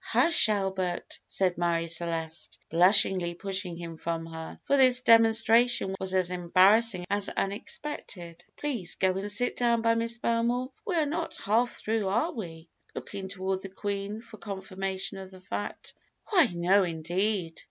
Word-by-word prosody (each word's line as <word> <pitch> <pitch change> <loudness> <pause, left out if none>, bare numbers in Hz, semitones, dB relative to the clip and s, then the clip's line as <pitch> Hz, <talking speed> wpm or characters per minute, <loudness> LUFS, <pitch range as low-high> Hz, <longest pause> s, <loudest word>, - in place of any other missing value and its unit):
"Hush, 335 -8 +4
Albert," 190 -3 -2
said 185 -2 0
Marie 170 -1 0
Celeste, 165 -1 -3
blushingly 180 0 +4
pushing 190 -2 -2
him 165 -1 -8
from 165 0 -4
her, 160 0 -9
for 280 - +1
this 255 -2 +5
demonstration 230 -2 +4
was 190 0 -1
as 185 -1 +1
embarrassing 185 +3 +3
as 205 0 +1
unexpected; 195 - -5
"please 240 - -3
go 190 -1 +1
and 200 +2 -2
sit 245 +4 +2
down 235 -2 +1
by 230 0 +3
Miss 230 +1 0
Belmore, 240 +2 -1
for - - -33
we 370 - -1
are 320 -2 +2
not 330 +3 -4
half 230 +4 +2
through, 220 -3 -2
are 210 +5 0
we?" 165 -6 -8 0.3
looking 195 -1 -6
toward 190 0 -3
the 195 - -8
Queen 200 +2 -4
for 230 -1 -14
confirmation 195 -1 -4
of 190 -1 -9
the 185 -1 -14
fact. 205 +2 -6 0.4
"Why, 350 - +5
no 180 +3 +3
indeed! 175 +2 -2
195 Hz, 155 wpm, -28 LUFS, 175-230 Hz, 0.4 s, this